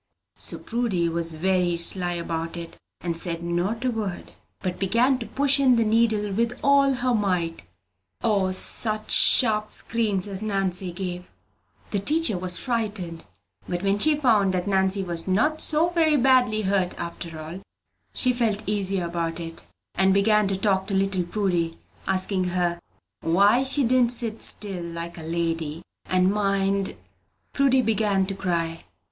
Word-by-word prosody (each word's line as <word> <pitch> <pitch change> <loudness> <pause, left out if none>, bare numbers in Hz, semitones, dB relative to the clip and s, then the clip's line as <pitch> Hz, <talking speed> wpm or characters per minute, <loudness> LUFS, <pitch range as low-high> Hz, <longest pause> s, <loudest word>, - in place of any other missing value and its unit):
So - - 0
Prudy 225 -8 -1
was 165 -1 -2
very 180 0 +1
sly 175 +1 +3
about 165 0 -4
it, 170 -1 -8 0.3
and 170 -1 -2
said 170 -1 -5
not 180 +8 -2
a 255 - +2
word, 210 -6 -5 0.3
but 180 -2 -4
began 235 +7 +2
to 230 - -6
push 280 0 +2
in 260 -3 +5
the 230 -1 +2
needle 215 -2 +2
with 235 +4 -1
all 280 -1 +4
her 250 -1 0
might. 180 -6 -1 0.6
O, 200 -4 +2
such 215 +3 -1
sharp 215 -4 +4
screams 210 -5 -1
as 195 -1 -2
Nannie 195 -3 -2
gave! 180 0 -6 0.6
The 205 - 0
teacher 305 +3 +1
was 180 0 +1
frightened; 205 -9 -3 0.4
but 175 +1 -3
when 200 +1 +1
she 310 +6 +3
found 215 -9 +2
that 180 - -1
Nannie 190 0 +1
was 170 -2 -3
not 300 +12 +1
so 320 +3 +3
very 320 -3 +3
badly 245 -4 +3
hurt 190 -2 0
after 170 -1 -6
all, 160 +5 -8 0.5
she 255 -1 +2
felt 220 -3 -1
easier 195 -3 0
about 170 -1 -3
her, 165 -1 -5 0.4
and 190 +1 +3
began 210 +1 +3
to 195 -1 -1
talk 190 -1 0
to 200 - -2
little 190 -2 0
Prudy, 175 -4 -1 0.3
asking 185 0 0
her 175 -1 -1 0.4
"why 200 +8 +3
she 270 +1 +1
didn't 245 0 +4
sit 230 -2 -1
still, 195 -4 -1
like 170 0 -6
a - - -8
lady, 165 -1 -3 0.2
and 185 +1 +2
mind?" 195 -1 0 0.6
Prudy 265 -2 +3
began 210 -3 +1
to 195 - -4
cry. 170 -4 -2
195 Hz, 155 wpm, -24 LUFS, 175-225 Hz, 0.6 s, in